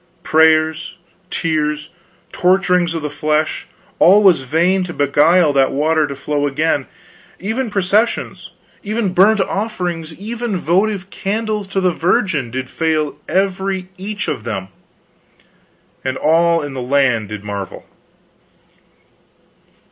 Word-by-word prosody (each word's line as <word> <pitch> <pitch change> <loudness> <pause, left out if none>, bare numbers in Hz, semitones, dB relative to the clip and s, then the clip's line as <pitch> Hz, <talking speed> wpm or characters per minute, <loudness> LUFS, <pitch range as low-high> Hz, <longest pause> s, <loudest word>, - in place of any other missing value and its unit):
Prayers, 160 +2 +2 0.3
tears, 150 -2 -2 0.4
torturings 180 -2 +2
of 160 - -4
the 150 - -2
flesh, 155 +1 -1 0.3
all 200 +4 +6
was 185 -8 +5
vain 170 +8 +1
to 175 -2 -7
beguile 150 +3 +3
that 135 -1 +3
water 155 +2 +1
to 140 - -6
flow 145 +1 -1
again. 145 -1 0 0.5
Even 225 +6 -2
processions; 200 +3 0 0.3
even 210 -2 -2
burnt 200 +4 +4
offerings; 180 -6 -3
even 225 0 -3
votive 190 +3 0
candles 215 0 -3
to 195 0 -2
the 185 -2 +1
Virgin, 170 - 0
did 130 +2 -4
fail 155 0 -1
every 190 -1 -1
each 205 +2 -5
of - - -3
them; 100 -5 -4 1.3
and 130 0 -2
all 165 +2 +3
in 145 -2 -6
the 130 - -5
land 125 -5 +1
did 105 -1 -7
marvel." 100 -2 -6
165 Hz, 120 wpm, -18 LUFS, 145-195 Hz, 1.3 s, all